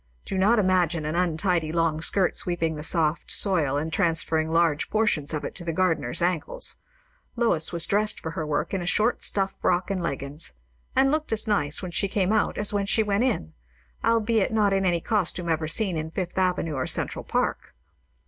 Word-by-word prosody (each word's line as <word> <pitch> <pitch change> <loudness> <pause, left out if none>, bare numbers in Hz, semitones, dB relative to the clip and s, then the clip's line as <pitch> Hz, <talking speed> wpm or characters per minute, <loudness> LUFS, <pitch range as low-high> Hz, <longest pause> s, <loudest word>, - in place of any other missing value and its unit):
Do - - -4
not 205 +5 +3
imagine 180 -5 +1
an 155 - -2
untidy 170 -1 0
long 165 -1 0
skirt 185 +1 +1
sweeping 170 -2 -1
the 150 - -6
soft 160 0 0
soil 160 -9 +3
and 160 +2 -3
transferring 165 -3 +1
large 165 -2 +2
portions 210 -10 +1
of 150 -2 -3
it - - -5
to 180 - -7
the 170 - -2
gardener's 170 -5 0
ankles; 180 - -1 0.6
Lois 230 -10 +1
was 170 -1 0
dressed 210 +1 0
for 160 - -5
her 165 - -4
work 150 +3 -2
in 190 - -1
a 175 - -5
short 220 +6 +1
stuff 195 -1 +1
frock 180 +2 +1
and 190 -2 -1
leggins; 140 - -3 0.4
and 270 +1 +4
looked 310 0 -1
as 220 - +1
nice 150 -6 0
when 180 - -5
she 200 - 0
came 195 0 0
out 215 - +1
as 210 0 +1
when 200 -1 0
she 220 +2 +3
went 205 +2 +1
in, 140 - -2 0.5
albeit 225 -2 +2
not 210 -3 +2
in 195 -1 +1
any 170 -2 +1
costume 185 -4 -1
ever 160 -1 0
seen 185 +3 0
in 160 0 -3
Fifth 180 +1 -4
Avenue 180 -4 0
or 130 -2 -2
Central - - -2
Park. - - -2
175 Hz, 195 wpm, -25 LUFS, 160-200 Hz, 0.6 s, and